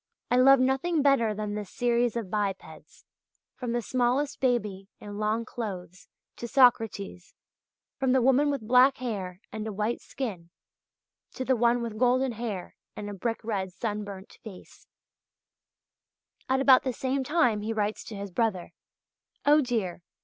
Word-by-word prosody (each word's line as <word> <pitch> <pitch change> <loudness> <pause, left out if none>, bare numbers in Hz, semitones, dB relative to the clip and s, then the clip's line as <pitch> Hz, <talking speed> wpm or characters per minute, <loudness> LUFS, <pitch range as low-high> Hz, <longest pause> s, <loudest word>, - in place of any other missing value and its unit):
I 245 - +4
love 270 +1 +7
nothing 270 +5 +1
better 275 -6 +3
than 210 0 -4
this 210 -2 -5
series 240 -1 +1
of 220 -6 -4
bipeds, 190 -7 -4 0.5
from 245 -2 -5
the 240 0 -1
smallest 255 +4 0
baby 210 -7 -1
in 205 0 -8
long 215 +2 0
clothes 185 -6 -7 0.3
to 235 - -5
Socrates, 225 -8 +2 0.6
from 265 -1 +1
the 260 0 +4
woman 270 +3 +4
with 275 -7 -3
black 255 +3 +5
hair 195 -7 -5
and 220 0 -5
a - - -3
white 210 +4 -2
skin 195 -11 -6 0.8
to 260 - -4
the 260 - +3
one 240 0 +2
with 220 -2 -5
golden 255 +1 +3
hair 220 -5 -5 0.2
and 205 0 -6
a - - -6
brick 225 +4 -3
red 195 -4 -3
sunburnt 205 -2 -6
face" 200 -5 -13
(page - - -47
85). - - +3
At 265 - +1
about 265 -1 +7
the 260 - -2
same 265 +2 -1
time 255 -7 +2
he 215 +2 -3
writes 215 -1 -2
to 220 - -8
his 200 -1 -6
brother: 195 -3 -1 0.7
"Oh, 295 +1 +6
dear! 225 -10 -2
230 Hz, 160 wpm, -27 LUFS, 205-255 Hz, 0.8 s, love